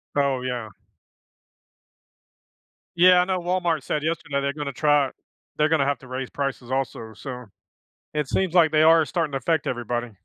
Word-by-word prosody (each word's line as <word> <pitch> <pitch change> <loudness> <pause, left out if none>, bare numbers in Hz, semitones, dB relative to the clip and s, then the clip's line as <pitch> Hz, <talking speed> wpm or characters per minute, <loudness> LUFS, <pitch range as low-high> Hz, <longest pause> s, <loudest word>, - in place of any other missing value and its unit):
Oh, 140 -3 +1
yeah. 125 -3 -4 2.3
Yeah, 180 +1 +7
I - - +1
know 185 -1 -1
Walmart 175 -4 -1
said 150 +2 -2
yesterday 150 -3 -2
they're 140 0 -1
gonna 145 -2 -5
try 145 -1 +2 0.5
they're 150 0 +3
gonna 155 -4 +2
have 140 -2 0
to 130 - -14
raise 130 0 -5
prices 135 -3 -4
also. 125 -4 -3
So, 125 +2 -8 0.7
it 150 -3 -1
seems 185 +1 0
like 160 -3 +5
they 155 - +4
are 160 0 +6
starting 165 -2 -2
to 135 - -1
affect 160 +4 0
everybody. 120 -1 -3
145 Hz, 165 wpm, -24 LUFS, 130-160 Hz, 2.3 s, Yeah